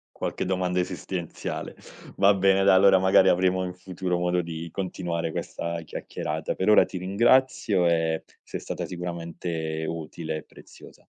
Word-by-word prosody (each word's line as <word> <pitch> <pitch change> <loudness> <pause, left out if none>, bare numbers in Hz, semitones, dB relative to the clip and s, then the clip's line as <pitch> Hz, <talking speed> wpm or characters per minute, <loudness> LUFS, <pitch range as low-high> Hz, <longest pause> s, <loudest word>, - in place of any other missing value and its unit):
Qualche - - -3
domanda 90 -1 0
esistenziale. 90 -1 -4 0.4
Va 100 +1 +6
bene, 95 0 +3
dai, 100 -1 +6
allora 95 0 +6
magari 95 0 +5
avremo 95 +1 +2
in 90 0 -4
futuro 90 0 -3
modo 90 0 +1
di 85 0 -6
continuare 85 -3 -3
questa 85 +1 -4
chiacchierata. 80 - -4
Per 95 - 0
ora 105 - +7
ti 95 - -7
ringrazio 105 -1 +3
e 80 -1 +1 0.2
sei - - -6
stata - - -5
sicuramente 85 -2 -4
utile 80 -1 -5
e - - -8
preziosa. - - -16
90 Hz, 145 wpm, -26 LUFS, 85-95 Hz, 0.4 s, ora